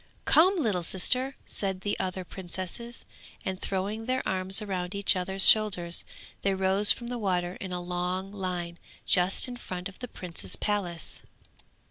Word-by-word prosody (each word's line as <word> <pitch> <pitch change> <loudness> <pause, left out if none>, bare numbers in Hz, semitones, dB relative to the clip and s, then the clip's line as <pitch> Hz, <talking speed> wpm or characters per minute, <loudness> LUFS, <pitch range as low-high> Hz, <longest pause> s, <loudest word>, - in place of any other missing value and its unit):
'Come, 370 +5 +7
little 215 - 0
sister!' 255 +10 0
said 190 -2 -2
the 205 +1 -1
other 185 0 -3
princesses, 190 +6 -7 0.4
and, 190 0 -3
throwing 205 +4 -3
their 260 0 0
arms 190 +1 +5
round 190 -3 -3
each 200 0 +3
other's 190 +1 +4
shoulders, 190 -6 +3 0.4
they 195 -1 +1
rose 190 +2 +4
from 240 - -1
the 245 0 -4
water 180 -4 0
in 190 - -5
a 180 - -2
long 180 +2 -3
line, 180 -4 -4 0.3
just 180 +6 +2
in 245 -1 -6
front 185 -5 -5
of 195 - -14
the 250 - -5
prince's 180 -6 -5
palace. 185 -6 -1
190 Hz, 155 wpm, -28 LUFS, 180-210 Hz, 0.4 s, Come